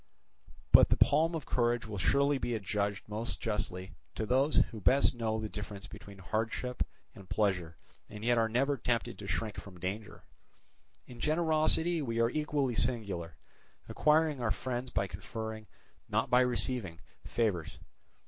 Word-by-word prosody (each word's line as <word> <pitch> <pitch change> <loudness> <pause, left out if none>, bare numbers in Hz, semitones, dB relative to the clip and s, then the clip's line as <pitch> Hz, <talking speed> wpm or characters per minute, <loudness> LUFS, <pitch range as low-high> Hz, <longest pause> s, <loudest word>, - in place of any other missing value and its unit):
But - - +8
the - - +3
palm 160 +3 +4
of 155 - -4
courage 120 -1 +1
will 105 -3 -5
surely 140 - +3
be 120 -2 -1
adjudged 100 -1 -2
most 110 +3 -1
justly 105 -4 -3 0.2
to 110 - -2
those, 135 +6 +2
who 110 -3 +2
best 130 +11 +4
know 110 -2 -1
the 110 - -3
difference 105 -1 -7
between 100 -1 -11
hardship 110 +6 -3 0.3
and 95 -2 -14
pleasure 95 -6 0 0.3
and 105 +1 -8
yet 120 -1 +4
are 110 0 +2
never 135 +5 +1
tempted 120 -1 -1
to 100 - -7
shrink 110 +1 -2
from 95 -3 -12
danger. 100 +4 -5 0.8
In 120 -1 -12
generosity 160 +2 +2
we 115 -4 -2
are 115 +1 +3
equally 150 -4 0
singular, 100 - -1 0.5
acquiring 150 -2 +2
our 120 - 0
friends 125 +5 -3
by 100 - 0
conferring, 110 +4 -6 0.4
not - - 0
by 125 +1 +6
receiving, 120 -8 -1 0.3
favours. 100 -9 -1
115 Hz, 150 wpm, -32 LUFS, 100-130 Hz, 0.8 s, But